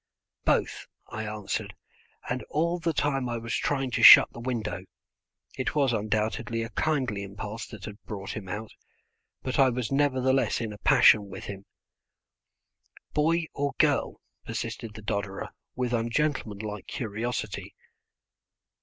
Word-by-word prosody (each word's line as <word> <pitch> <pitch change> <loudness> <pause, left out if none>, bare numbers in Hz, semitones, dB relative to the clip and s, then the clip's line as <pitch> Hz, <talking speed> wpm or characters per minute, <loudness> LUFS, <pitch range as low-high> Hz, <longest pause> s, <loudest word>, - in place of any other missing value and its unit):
"Both," - - +1 0.2
I 110 0 -4
answered, 105 -2 -4 0.5
and 125 +1 -2
all 170 +3 0
the 165 0 0
time 135 -4 0
I 120 - -2
was 115 0 -5
trying 135 -3 0
to - - -1
shut - - +10
the - - -9
window. 115 -6 -3 0.8
It 130 - -1
was 140 -4 +3
undoubtedly 110 +1 -1
a 115 - -5
kindly 130 -10 0
impulse 105 +3 -6
that 105 -4 -9
had 105 0 -9
brought 100 -2 -5
him 100 -4 -7
out, 105 +3 -5 0.7
but 130 +1 -2
I 135 -1 +6
was 125 0 -3
nevertheless 135 -1 +2
in 110 -3 -3
a 105 - -11
passion 105 -2 +6
with - - -8
him. 100 0 -7 1.5
"Boy 165 +3 +2
or 140 -1 -1
girl?" 145 -3 +2 0.2
persisted 110 -2 -5
the 110 - -9
dodderer 100 -1 -3 0.3
with 125 -1 -1
ungentlemanlike 115 -4 -1
curiosity. 110 -2 -4
115 Hz, 135 wpm, -28 LUFS, 105-135 Hz, 1.5 s, shut